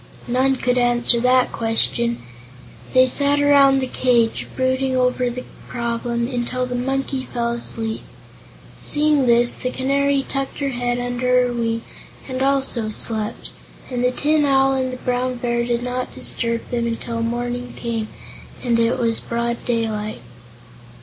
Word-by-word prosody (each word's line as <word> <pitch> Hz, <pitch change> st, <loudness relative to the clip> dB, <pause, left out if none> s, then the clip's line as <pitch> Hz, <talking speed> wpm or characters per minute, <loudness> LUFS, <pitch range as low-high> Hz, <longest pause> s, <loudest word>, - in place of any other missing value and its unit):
None 260 Hz, +2 st, +2 dB
could 250 Hz, -1 st, 0 dB
answer 240 Hz, 0 st, +3 dB
that 250 Hz, +1 st, +3 dB
question. 235 Hz, +1 st, 0 dB, 0.7 s
They 255 Hz, 0 st, +7 dB
sat 285 Hz, +3 st, +3 dB
around 280 Hz, -1 st, +5 dB
the -, -, 0 dB
cage, 240 Hz, -3 st, +1 dB
brooding 260 Hz, 0 st, 0 dB
over 250 Hz, 0 st, +1 dB
the 250 Hz, +1 st, -6 dB, 0.2 s
problem, 235 Hz, 0 st, -2 dB
until 250 Hz, 0 st, -2 dB
the 250 Hz, -, -5 dB
Monkey 265 Hz, +1 st, -2 dB
fell 235 Hz, -1 st, -1 dB
asleep. 225 Hz, -1 st, 0 dB, 0.8 s
Seeing 295 Hz, -3 st, +2 dB
this, 240 Hz, 0 st, +5 dB
the 250 Hz, -, -3 dB
Canary 275 Hz, +1 st, 0 dB
tucked 275 Hz, -1 st, -3 dB
her 280 Hz, -1 st, -1 dB
head 245 Hz, -1 st, -1 dB
under 250 Hz, +1 st, +1 dB
her 245 Hz, -, -2 dB
wing 230 Hz, -1 st, -2 dB, 0.4 s
and 260 Hz, -1 st, -4 dB
also 265 Hz, -5 st, +2 dB
slept, 215 Hz, 0 st, -2 dB, 0.4 s
and 245 Hz, -1 st, -1 dB
the 250 Hz, -, +4 dB
Tin 295 Hz, +4 st, +1 dB
Owl 270 Hz, -1 st, +3 dB
and 260 Hz, -1 st, -1 dB
the 255 Hz, -, -6 dB
Brown 250 Hz, 0 st, -1 dB
Bear 235 Hz, -1 st, -1 dB
did 240 Hz, 0 st, -1 dB
not 250 Hz, 0 st, -3 dB
disturb 230 Hz, -1 st, -1 dB
them 235 Hz, -1 st, 0 dB
until 230 Hz, 0 st, -3 dB
morning 245 Hz, +1 st, -3 dB
came 230 Hz, -2 st, -3 dB, 0.6 s
and 235 Hz, -2 st, +2 dB
it 230 Hz, +1 st, +2 dB
was 230 Hz, -2 st, 0 dB
broad 235 Hz, 0 st, -3 dB
daylight. 220 Hz, -3 st, -2 dB
245 Hz, 150 wpm, -21 LUFS, 235-260 Hz, 0.8 s, They